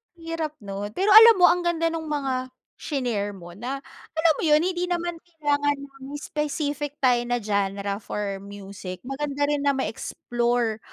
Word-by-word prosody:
Hirap 330 -2 -4
'no? 200 +1 -4
Pero 395 +2 +2
alam 450 +1 +10
mo, 360 -1 +6
ang 355 0 0
ganda 330 -1 +1
nung 320 -1 -4
mga 265 -3 -1 0.3
shinare 235 -8 -2
mo 175 -1 -11
na 265 +4 -4 0.3
alam 320 0 +4
mo - - -3
yun, 300 0 +5
hindi 360 0 0
naman 345 -1 -2
kailangan 290 -4 -1
na 275 -1 -12
may 290 +1 -6
specific 295 -1 -2
tayo 250 -2 +5
na 245 -1 -1
genre 200 -1 -1
for 200 -2 -4
music, 195 -2 -8
maganda 285 +2 -2
rin 290 -1 0
na 280 - +4
ma-explore 240 -3 -1
280 Hz, 165 wpm, -25 LUFS, 215-320 Hz, 0.3 s, alam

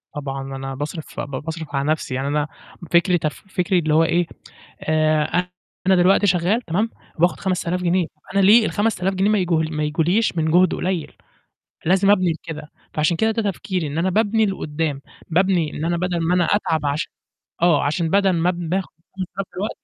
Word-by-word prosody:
طبعًا. 135 -2 -4
أنا 135 0 -5
باصرِف 150 +3 -6
ب - - -2 0.2
باصرِف 160 -2 -6
على 140 +1 0
نفْسي، 155 -4 -2
يعني 135 +1 -2
أنا 150 +1 0 0.5
فكري 175 +1 +4
تف 155 +3 -4
فكري 180 -1 +1
اللي 155 -2 0
هو 160 +1 +5
إيه، 170 +1 +1 0.5
آآ 155 +3 +1 0.4
أنا 190 - +6
دلوقتي 190 +3 +4
شغال 180 +5 +2
تمام، 210 +3 -1 0.3
وباخد 175 +2 +2
5000 180 -1 -1
جنيه، 180 0 +2
طَب 150 -1 -21
أنا 200 - +3
ليه 215 +4 +6
ال5000 205 -3 0
جنيه 195 +2 +1
ما 215 - +3
يج 180 -2 -1
ما 155 -1 0
يجوليش 170 +6 +1
من 160 0 +1
جُهد 180 +2 +4
قليّل؟ 180 -3 -2 0.8
لازم 190 +3 +4
أبني 185 -4 +3
لكده، 160 -1 -7 0.3
فعشان 155 +3 +1
كده 220 +6 +2
ده 225 0 -1
تفكيري 185 -2 -3
إن 145 +2 -4
أنا 185 +3 +1
بابني 220 +2 +2
لقُدّام، 155 -6 -2 0.3
بابني 175 -2 +2
إن 155 - -3
أنا 170 +1 0
بَدَل 175 -1 -1
ما 170 +2 +1
أنا 180 - +3
أتعب 160 -5 0
عش 145 +3 -1 0.5
آه، 170 -5 +4
عشان 160 +3 0
بَدَل 195 0 +3
ما 170 +1 +2
باخد 180 +2 -2 0.3
5000 190 0 -4
دلوقت 205 +4 -2
175 Hz, 185 wpm, -21 LUFS, 155-190 Hz, 0.8 s, أنا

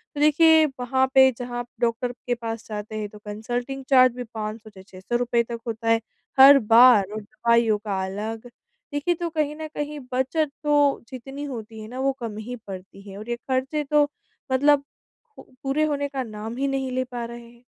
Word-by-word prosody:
तो 290 - -3
देखिए 315 +1 +6 0.2
वहाँ 260 +2 +2
पे 265 0 +8
जहाँ 245 0 -4
आप 240 - -5
डॉक्टर 240 +1 0 0.2
के 245 - +1
पास 230 -1 -6
जाते 210 0 -6
हैं 210 -1 -4
तो 210 - -13
कंसल्टिंग 240 +6 -4
चार्ज 255 -2 +6
भी 250 - -4
₹500 215 0 -5
से 190 -3 -14
₹600 190 +4 -6
रुपए 240 -1 +1
तक 235 0 -6
होता 225 0 -3
है। 225 0 +4 0.4
हर 275 +1 +10
बार 230 -1 +7
और 215 - -4
दवाइयों 235 -1 +2
का 190 -1 -1
अलग 220 +5 -5 0.4
देखिए 290 +5 +1
तो 345 -1 -2
कहीं 305 -2 -1
न 315 0 -6
कहीं 295 0 -4
बचत 270 +4 0
तो 290 -1 +3
जितनी 270 +3 -8
होती 225 -5 -7
है 215 - -8
ना 255 +3 -7
वो 275 +1 +2
कम 225 -3 -5
ही 245 - -4
पड़ती 190 0 -9
है 195 - -9
और 215 +3 -9
ये 240 - 0
खर्चे 265 +4 -2
तो 295 -1 +5 0.4
मतलब 285 +2 +4 0.5
पू - - -10 0.2
पूरे 275 +3 +1
होने 285 -2 -1
का 270 -2 -3
नाम 220 0 -7
ही 275 +1 0
नहीं 270 -1 -2
ले 255 0 0
पा 245 -2 -6
रहे 235 +1 -8
हैं। 240 0 -21
245 Hz, 200 wpm, -24 LUFS, 225-275 Hz, 0.5 s, हर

